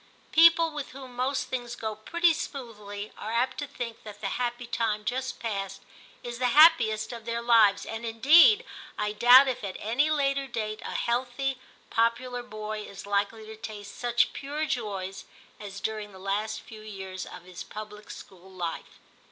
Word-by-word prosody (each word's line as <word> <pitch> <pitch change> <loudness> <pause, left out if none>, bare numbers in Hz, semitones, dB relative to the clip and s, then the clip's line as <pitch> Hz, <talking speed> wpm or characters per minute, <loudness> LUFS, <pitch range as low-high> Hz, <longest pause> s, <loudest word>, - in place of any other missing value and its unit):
People 330 0 +6
with 295 -4 -6
whom 260 -2 -10
most 260 +3 0
things 245 -1 -4
go 220 -2 -4
pretty 340 +11 +2
smoothly 210 -9 -6
are 215 - -5
apt 240 +5 0
to 290 - -3
think 240 -4 -6
that 210 -1 -10
the 195 - -2
happy 240 +2 -2
time 220 -3 -1
just 255 +2 -2
past 200 -4 -4 0.4
is 240 0 -6
the 250 - +2
happiest 245 -9 +6
of 230 -2 -9
their 235 0 -2
lives, 225 -4 +4
and 225 +1 -6
indeed 290 - +6 0.3
I 210 0 -1
doubt 245 +5 +8
if 255 -4 -2
at 195 -2 -4
any 245 +8 +1
later 275 -2 +1
date 215 -3 -4
a - - -6
healthy 255 +2 -1 0.3
popular 245 +2 +1
boy 215 -2 -6
is 200 -1 -9
likely 205 +2 -1
to 220 0 -9
taste 215 -2 -8
such 240 0 +1
pure 295 +3 -3
joys 195 -8 -4 0.3
as 200 -1 -8
during 215 -2 -4
the - - -11
last 210 +3 -2
few 220 -1 -12
years 190 -3 -7
of 180 - -10
his 180 -1 -10
public 210 0 -9
school 190 0 -12
life. 175 -3 -6
225 Hz, 170 wpm, -28 LUFS, 210-255 Hz, 0.4 s, doubt